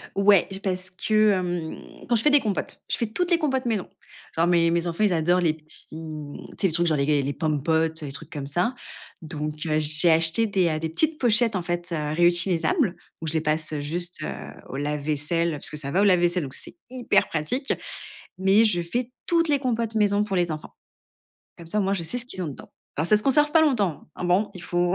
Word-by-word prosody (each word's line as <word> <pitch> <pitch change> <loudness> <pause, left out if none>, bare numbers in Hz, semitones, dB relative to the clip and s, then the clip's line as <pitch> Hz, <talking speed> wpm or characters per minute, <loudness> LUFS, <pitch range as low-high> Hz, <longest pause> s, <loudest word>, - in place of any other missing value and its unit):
Ouais, 200 -2 +4 0.2
parce, 185 -1 -2 0.2
hem, 185 -6 +1 0.3
quand 240 - +2
je 220 - +3
fais 300 - +4
des 290 0 +5
compotes, 210 -5 -4
je - - +1
fais 230 - -1
toutes 350 - -2
les 345 - +4
compotes 265 -5 -1
maison. 220 -6 -2 0.5
Enfin 165 +1 +2
mes 170 -1 +3
mes 170 +1 0
enfants, 170 +5 -1
ils 205 - +2
adorent 175 +3 +2
les 165 -3 +1
petits 155 -1 -9
mmh, 155 -2 -8
tu - - -14
sais, - - +3
les 180 - -1
trucs 175 +2 +1
genre 155 -3 +1
les 145 +1 +1
les 140 +1 -2
Pom'potes, 160 +2 0
les 145 -2 -5
trucs 155 +3 -5
comme 145 -3 -6
ça. 175 - 0 0.5
Donc 155 -2 -5
heu, 155 -1 +1
j'ai 155 +3 +7
acheté 165 +7 +6
des, 190 -4 +1
heu, 155 -1 -1
des 160 0 -4
petites 310 - +2
pochettes 230 -3 +2
en 185 - -2
fait, 175 0 -4
heu, 150 -2 -2
réutilisables 175 - +3 0.3
où - - -4
je 155 - -2
les 160 - +1
passe, 155 0 0
heu, 150 - -2
juste, 175 +4 -4
heu, - - -3 0.4
au - - -6
lave 145 +1 -2
vaisselle 155 +3 -1
parce 150 - -6
que 150 - -5
ça 140 -2 -5
va 185 +7 +2
au - - +4
lave 185 -3 +4
vaisselle, 175 0 +1
donc 135 -2 -6
ça - - -8
c'est - - -13
hyper 255 -2 +1
pratique. 210 - -2 0.7
Mais 195 +4 +4
je 175 -6 +1
fais 240 +9 -3 0.2
toutes 335 -1 +2
les 290 -1 +2
compotes 230 -4 -2
maison 205 -1 +2
pour 205 -2 -3
les 175 -2 0
enfants. 155 - -9 0.8
Comme 170 - -12
ça 210 - -1
au - - +2
moins, 195 +1 0
je 180 - -3
sais 205 +9 -3
ce 245 - 0
qu'ils 190 -7 -5
ont 170 - -3
dedans. 140 - -10 0.3
Alors 155 +3 -1
ça 210 - +5
conserve 275 +7 +2
pas 320 +1 +4
longtemps. 210 - 0
Hein, - - -6
bon, 180 +4 +1
il 180 - -10
faut 175 0 0
175 Hz, 240 wpm, -24 LUFS, 155-215 Hz, 0.8 s, j'ai